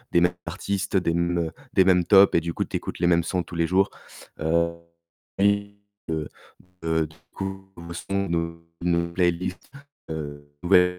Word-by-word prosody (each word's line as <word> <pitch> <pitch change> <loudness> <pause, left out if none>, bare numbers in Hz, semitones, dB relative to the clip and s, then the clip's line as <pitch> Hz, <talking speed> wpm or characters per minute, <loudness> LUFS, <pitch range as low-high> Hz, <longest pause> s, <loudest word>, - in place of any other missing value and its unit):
des 85 - +5
mêmes 90 0 +3
artistes, 100 0 -2
des 85 -2 0
mêmes 85 -1 +1 0.2
des 95 - +6
mêmes 90 -2 +4
tops 100 +2 +7
et - - +4
du 85 0 -4
coup, - - 0
tu - - -4
écoutes - - -6
les 85 - +3
mêmes 85 -1 +4
sons 90 +1 0
tous 85 0 -9
les 85 - +2
jours. 95 +3 +3 0.5
Heu 85 +1 +2 0.6
li 100 0 +2 0.3
heu, 80 -2 -2 0.5
de 80 -1 +1
du 80 - -18 0.2
coup 95 0 -6
nouveaux 85 0 -8
sons, 100 +2 -2
nou 85 0 -2 0.2
nouveau 85 -1 +1
playlist, 90 0 0 0.4
heu, 75 -2 -6
nouvelle 90 0 +4
85 Hz, 175 wpm, -25 LUFS, 85-95 Hz, 0.6 s, tops